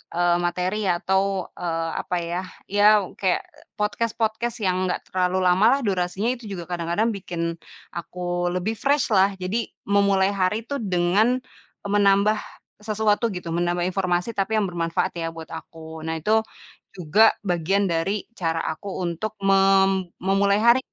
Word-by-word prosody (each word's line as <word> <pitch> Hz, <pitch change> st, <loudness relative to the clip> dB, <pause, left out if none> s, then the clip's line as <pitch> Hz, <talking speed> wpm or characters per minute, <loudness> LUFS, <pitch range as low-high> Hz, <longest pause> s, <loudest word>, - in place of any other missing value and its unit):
eee, 175 Hz, 0 st, +3 dB
materi 185 Hz, +4 st, -1 dB
atau, 190 Hz, +2 st, 0 dB
eee, 165 Hz, -1 st, -2 dB
apa 180 Hz, -, -3 dB
ya, 175 Hz, +2 st, -2 dB, 0.3 s
ya 205 Hz, 0 st, +3 dB, 0.3 s
kayak, 185 Hz, -2 st, +1 dB
eee, -, -, -22 dB, 0.2 s
podcast-podcast 225 Hz, +2 st, -1 dB
yang 185 Hz, 0 st, +1 dB
enggak -, -, -2 dB
terlalu 185 Hz, 0 st, +1 dB
lama 180 Hz, +4 st, +4 dB
lah -, -, -6 dB
durasinya, 190 Hz, +4 st, 0 dB
itu 235 Hz, -2 st, -13 dB
juga 175 Hz, -3 st, -5 dB
kadang-kadang 175 Hz, +6 st, 0 dB
bikin 170 Hz, -3 st, -4 dB, 0.4 s
aku 175 Hz, 0 st, -3 dB
lebih 180 Hz, +4 st, -1 dB
fresh 280 Hz, -3 st, +1 dB
lah. 195 Hz, 0 st, +4 dB
Jadi 200 Hz, +6 st, -2 dB, 0.2 s
memulai 200 Hz, -1 st, +3 dB
hari 200 Hz, +3 st, 0 dB
tuh 280 Hz, -1 st, -3 dB
dengan 195 Hz, +6 st, +2 dB, 0.5 s
e -, -, -2 dB
menambah 200 Hz, +1 st, +4 dB, 0.4 s
sesuatu 215 Hz, +1 st, +1 dB
gitu, 180 Hz, -2 st, -6 dB
menambah 175 Hz, 0 st, 0 dB
informasi, 180 Hz, +2 st, 0 dB
tapi 200 Hz, +3 st, 0 dB
yang -, -, +1 dB
bermanfaat 170 Hz, +1 st, -1 dB
ya 165 Hz, -, -2 dB
buat 160 Hz, -1 st, -9 dB
aku. 160 Hz, 0 st, -9 dB
Nah, 160 Hz, -, -2 dB
itu 220 Hz, +1 st, +4 dB, 0.6 s
juga 185 Hz, +6 st, +5 dB
bagian 180 Hz, +3 st, +1 dB
dari 190 Hz, +5 st, -1 dB, 0.2 s
cara 165 Hz, -2 st, 0 dB
aku 200 Hz, +6 st, -9 dB, 0.2 s
untuk 175 Hz, +5 st, -3 dB
mem 195 Hz, -1 st, +4 dB, 0.2 s
memulai 200 Hz, +1 st, +3 dB
hari 235 Hz, +2 st, +6 dB
190 Hz, 150 wpm, -24 LUFS, 175-205 Hz, 0.6 s, hari